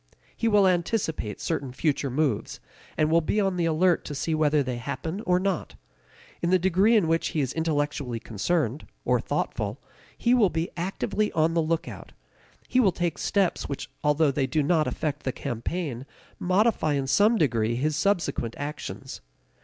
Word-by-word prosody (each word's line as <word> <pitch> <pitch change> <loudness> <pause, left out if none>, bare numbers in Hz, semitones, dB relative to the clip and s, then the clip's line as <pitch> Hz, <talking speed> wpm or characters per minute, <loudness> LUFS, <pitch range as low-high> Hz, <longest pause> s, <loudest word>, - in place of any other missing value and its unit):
He 230 - -1
will 205 -3 +5
anticipate 170 - -1
certain 140 -6 -2
future 140 +1 0
moves, 130 -4 -1 0.4
and 155 0 +2
will 165 +1 +5
be 205 +7 0
on 195 -2 +1
the 175 -1 0
alert 165 +2 +2
to 145 - -5
see 160 +4 -1
whether 150 -2 +3
they 125 -2 -3
happen 140 - -4
or 180 0 +4
not. 190 -2 -2 0.7
In 170 - 0
the 185 - +5
degree 190 +5 +3
in 205 -7 +3
which 165 +1 +1
he 155 - -2
is 135 -3 -1
intellectually 145 -6 -1
concerned, 130 - -1 0.2
or - - +3
thoughtful, - - -2 0.4
he 240 - +2
will 225 -6 +5
be 165 0 -2
actively 195 +4 -1
on 160 +1 +2
the 165 - +2
lookout; 160 +1 -3 0.5
he 255 - +2
will 205 -7 +5
take 175 -1 -2
steps 195 -4 0
which 140 - -5
although 150 0 +3
they 135 -1 0
do 155 +1 +1
not 155 +1 +2
affect 150 -2 -2
the 130 - -2
campaign, 135 +2 -4 0.3
modify 185 -4 +2
in 140 -1 0
some 210 - +4
degree 115 - +1
his 150 +5 0
subsequent 170 - 0
actions. 145 +1 -6
160 Hz, 170 wpm, -26 LUFS, 140-180 Hz, 0.7 s, will